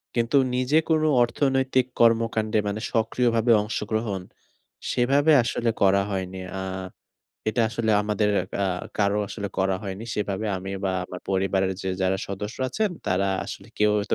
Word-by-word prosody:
কিন্তু 120 Hz, +4 st, +2 dB, 0.2 s
নিজে 130 Hz, +4 st, +2 dB
কোনো 155 Hz, -1 st, +3 dB, 0.2 s
অর্থনৈতিক 130 Hz, +1 st, +1 dB
কর্মকাণ্ডে 115 Hz, -2 st, +3 dB
মানে 100 Hz, +1 st, -2 dB
সক্রিয়ভাবে 115 Hz, 0 st, +2 dB
অংশগ্রহণ 105 Hz, -1 st, -2 dB, 0.7 s
সেভাবে 140 Hz, +5 st, +3 dB
আসলে 115 Hz, 0 st, -1 dB
করা 100 Hz, 0 st, +5 dB
হয়নি। 95 Hz, -1 st, -3 dB, 0.2 s
আ -, -, -3 dB, 0.9 s
এটা 110 Hz, +2 st, +1 dB
আসলে 110 Hz, -1 st, -1 dB
আমাদের 105 Hz, 0 st, 0 dB, 0.4 s
আ -, -, +1 dB, 0.3 s
কারো 100 Hz, 0 st, +2 dB
আসলে 100 Hz, -1 st, -5 dB
করা 95 Hz, 0 st, +2 dB
হয়নি। 100 Hz, +2 st, -5 dB
সেভাবে 105 Hz, 0 st, -2 dB
আমি 95 Hz, +1 st, -6 dB
বা 95 Hz, -, +1 dB
আমার 90 Hz, 0 st, -8 dB
পরিবারের 95 Hz, 0 st, +1 dB
যে 95 Hz, -, -2 dB
যারা 95 Hz, 0 st, +2 dB
সদস্য 105 Hz, +3 st, -5 dB
আছেন 210 Hz, -, 0 dB, 0.2 s
তারা 95 Hz, +2 st, +1 dB, 0.2 s
আসলে -, -, -8 dB
কেউ 105 Hz, 0 st, +4 dB, 0.2 s
তো -, -, +4 dB
110 Hz, 145 wpm, -25 LUFS, 95-120 Hz, 0.9 s, করা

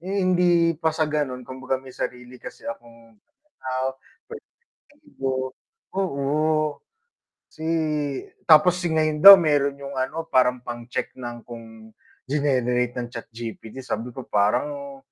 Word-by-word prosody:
eh, 190 Hz, +4 st, -4 dB
hindi 175 Hz, -2 st, +3 dB
pa 160 Hz, -, +2 dB
sa 160 Hz, -1 st, +1 dB
ganon 135 Hz, -4 st, -2 dB
kumbaga 130 Hz, +1 st, -4 dB
may 130 Hz, 0 st, -12 dB
sarili 125 Hz, 0 st, -6 dB
kasi -, -, -10 dB
akong 115 Hz, -1 st, -10 dB
pananaw, 130 Hz, -, -7 dB, 0.5 s
pwedeng 455 Hz, -, -10 dB, 0.6 s
ego, 135 Hz, -, -3 dB, 0.6 s
o, 155 Hz, -3 st, 0 dB, 0.7 s
si 155 Hz, -, -22 dB, 0.9 s
tapos 180 Hz, +3 st, +6 dB
ngayon 155 Hz, -2 st, 0 dB
daw 200 Hz, 0 st, +14 dB
meron 145 Hz, -4 st, +1 dB
yung 140 Hz, 0 st, -8 dB
ano 160 Hz, +5 st, -3 dB
parang 125 Hz, -1 st, +2 dB
pang-check 120 Hz, 0 st, -5 dB
ng 120 Hz, -2 st, -8 dB
kung 115 Hz, -2 st, -12 dB, 0.3 s
ginenerate 125 Hz, -4 st, 0 dB
ng 120 Hz, -1 st, -4 dB
ChatGPT, 115 Hz, +1 st, -8 dB
sabi 120 Hz, +2 st, -3 dB
ko 130 Hz, -, -6 dB
parang, 280 Hz, -, -1 dB
135 Hz, 125 wpm, -24 LUFS, 120-160 Hz, 0.9 s, daw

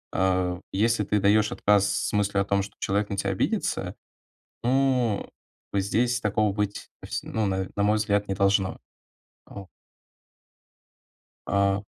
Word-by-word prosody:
э, 90 Hz, -1 st, +1 dB
если 110 Hz, +2 st, +2 dB
ты 105 Hz, +1 st, +1 dB
даёшь 105 Hz, +2 st, +3 dB
отказ 100 Hz, -1 st, +3 dB, 0.2 s
с -, -, -4 dB
мыслью 100 Hz, -1 st, +1 dB
о -, -, -1 dB
том, 100 Hz, 0 st, +1 dB
что 100 Hz, -, -9 dB
человек 100 Hz, +1 st, 0 dB
на 100 Hz, -, -3 dB
тя 100 Hz, 0 st, -1 dB
обидится, 95 Hz, -, -1 dB, 0.7 s
ну, 125 Hz, -4 st, +1 dB, 0.4 s
бы 100 Hz, -, +1 dB
здесь 120 Hz, +5 st, +1 dB
такого 105 Hz, 0 st, +1 dB
быть, 105 Hz, 0 st, -3 dB, 0.2 s
вс -, -, -3 dB
ну 110 Hz, -1 st, -2 dB
на 95 Hz, -1 st, -1 dB
на 100 Hz, -, +1 dB
мой 105 Hz, +1 st, +3 dB
взгляд, 105 Hz, -1 st, 0 dB
не 95 Hz, -, -1 dB
должно. 100 Hz, 0 st, +1 dB, 0.7 s
О. 100 Hz, -2 st, -9 dB, 1.8 s
А. 100 Hz, 0 st, +1 dB
100 Hz, 145 wpm, -26 LUFS, 100-105 Hz, 1.8 s, даёшь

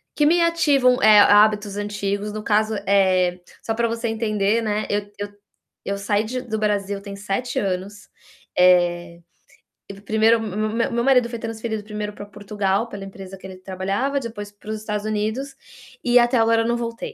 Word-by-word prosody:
que 295 Hz, -, +2 dB
me 340 Hz, +3 st, +4 dB
ativam, 290 Hz, -7 st, +3 dB
eh, 215 Hz, -3 st, +7 dB
hábitos 205 Hz, 0 st, +4 dB
antigos 205 Hz, 0 st, -3 dB
no 215 Hz, -, -5 dB
caso 215 Hz, +1 st, +1 dB
é, 185 Hz, -2 st, +2 dB, 0.2 s
só 225 Hz, -, -2 dB
para 235 Hz, +1 st, 0 dB
você 230 Hz, +1 st, -3 dB
entender 220 Hz, -1 st, 0 dB
né, 215 Hz, -1 st, -1 dB
eu 205 Hz, 0 st, -2 dB
eu 205 Hz, -, -3 dB, 0.6 s
eu 200 Hz, 0 st, -3 dB
saí 205 Hz, +1 st, 0 dB
de 250 Hz, +3 st, -4 dB
do 220 Hz, -3 st, -4 dB
Brasil 200 Hz, -1 st, -1 dB
tem 200 Hz, 0 st, -8 dB
7 200 Hz, +5 st, -3 dB
anos, 195 Hz, +1 st, -4 dB, 0.5 s
eh, 175 Hz, -1 st, +3 dB, 0.9 s
1º 220 Hz, +2 st, +3 dB
me 215 Hz, +2 st, -2 dB
meu 235 Hz, 0 st, 0 dB
marido 250 Hz, -2 st, +4 dB
foi 235 Hz, -1 st, -6 dB
transferido 225 Hz, -1 st, -4 dB
1º 210 Hz, 0 st, -5 dB
para 205 Hz, -, -9 dB
Portugal 205 Hz, +1 st, -2 dB
pela 200 Hz, -3 st, -8 dB
empresa 195 Hz, 0 st, -10 dB
que 190 Hz, -, -11 dB
ele 190 Hz, -1 st, -10 dB
trabalhava, 195 Hz, +9 st, -2 dB
depois 220 Hz, -5 st, -7 dB
para 205 Hz, +1 st, -14 dB
os 220 Hz, -, -2 dB
Estados 210 Hz, -1 st, -4 dB
Unidos, 215 Hz, +6 st, -2 dB, 0.5 s
e 245 Hz, 0 st, +5 dB
até 240 Hz, +1 st, +3 dB
agora 225 Hz, 0 st, +3 dB
eu 225 Hz, -, -1 dB
não 235 Hz, 0 st, +1 dB
voltei, 230 Hz, -1 st, -5 dB
210 Hz, 175 wpm, -22 LUFS, 200-230 Hz, 0.9 s, eh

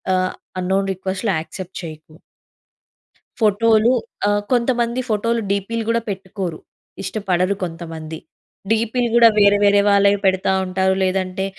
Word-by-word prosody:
ఆహ్, 185 Hz, 0 st, 0 dB, 0.3 s
అంనోన్ 195 Hz, +2 st, 0 dB
రిక్వెస్ట్‌లు 190 Hz, +2 st, -2 dB
యాక్సెప్ట్ 185 Hz, +3 st, -8 dB
చేయకు 155 Hz, -1 st, -10 dB, 1.3 s
ఫోటోలు 220 Hz, +2 st, +3 dB, 0.4 s
ఆహ్, 205 Hz, 0 st, +1 dB
కొంతమంది 240 Hz, 0 st, +1 dB
ఫోటోలు 230 Hz, +2 st, 0 dB
డీపీలు 200 Hz, +3 st, -1 dB
కూడా 230 Hz, 0 st, +2 dB
పెట్టుకోరు. 190 Hz, -3 st, -5 dB, 0.4 s
ఇష్టపడరు 195 Hz, -2 st, -1 dB
కొంతమంది. 165 Hz, -2 st, -7 dB, 0.5 s
డీపీలు 230 Hz, +2 st, +1 dB
కూడా 235 Hz, -1 st, +8 dB
వేరే 205 Hz, 0 st, +5 dB
వేరే 205 Hz, 0 st, +5 dB
వాళ్ళవి 200 Hz, 0 st, +4 dB
పెడతా 190 Hz, 0 st, +2 dB, 0.2 s
ఉంటారు. 190 Hz, +1 st, +1 dB
లేదంటే 185 Hz, 0 st, -1 dB
200 Hz, 115 wpm, -20 LUFS, 185-220 Hz, 1.3 s, కూడా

